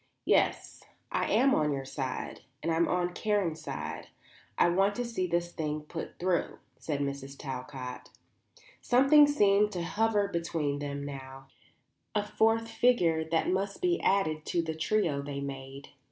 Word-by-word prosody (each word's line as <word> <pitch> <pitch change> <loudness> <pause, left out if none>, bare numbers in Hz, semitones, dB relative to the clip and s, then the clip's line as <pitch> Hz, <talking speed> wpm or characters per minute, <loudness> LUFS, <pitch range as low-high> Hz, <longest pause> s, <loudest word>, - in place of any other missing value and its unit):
"Yes; - - +1 0.3
I'm 270 0 +3
on 150 -1 +2
your 135 -1 -3
side, 135 -1 -4 0.2
and 165 - 0
I'm 165 +1 +2
on 180 0 0
Karen's 190 -6 0
side; - - -5 0.5
and 175 - +4
I - - -2
want 195 +2 +3
to 245 - -2
see 220 -6 -2
this 175 0 -1
thing 155 -2 -3
put 160 +2 -7
through," 180 -1 0 0.2
said 145 -3 -2
Mrs. 140 -1 -4
Talcott. 130 -2 -6 0.7
Something 275 +4 +6
seemed 210 -7 +3
to 175 -2 -2
hover 205 +4 +1
between 165 -5 -2
them 140 -1 -4
now, 135 -1 -9 0.7
a 210 - +2
fourth 225 +2 +2
figure 225 -9 +2
that 165 +1 +1
must 195 +2 -1
be 355 -1 +1
added 155 -6 +1
to 170 - +1
the 160 -1 -3
trio 160 -2 0
they 140 0 -5
made. 135 0 -7
165 Hz, 155 wpm, -30 LUFS, 140-205 Hz, 0.7 s, Something